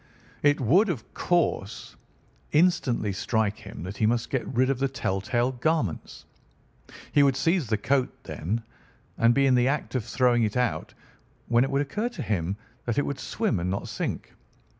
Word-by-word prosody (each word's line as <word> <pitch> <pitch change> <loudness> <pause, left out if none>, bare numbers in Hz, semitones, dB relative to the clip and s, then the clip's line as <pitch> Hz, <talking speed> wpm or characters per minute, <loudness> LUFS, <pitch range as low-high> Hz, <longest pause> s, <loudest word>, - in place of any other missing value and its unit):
It 145 0 +3
would 175 - +4
of 135 -11 -5
course 170 - -1 0.6
instantly 140 - +2
strike 110 +1 0
him - - -9
that 95 +3 -6
he 110 - +2
must 115 0 0
get 130 - -1
rid 130 +1 +2
of 130 - -2
the 135 - +2
tell 95 -8 -2
tale 120 +5 0
garments. 130 - -2 0.9
He 145 - +5
would 140 -2 +4
seize 165 +1 +1
the 110 0 +1
coat, 130 +5 +1
then, 105 +9 -3 0.6
and 115 +1 +5
be 140 - +4
in 135 - +4
the 125 0 +4
act 145 +1 -1
of 130 -4 0
throwing 120 +1 +2
it 110 +1 0
out, 125 -1 -1 0.5
when 120 +1 +4
it 135 - -1
would 140 +1 +1
occur 210 - -2
to 240 - -6
him 95 -2 -1 0.3
that 120 -2 -1
it 145 - +2
would 140 - -4
swim 210 - -1
and 90 +2 -2
not 95 - -3
sink. - - -4
125 Hz, 180 wpm, -26 LUFS, 110-140 Hz, 0.9 s, He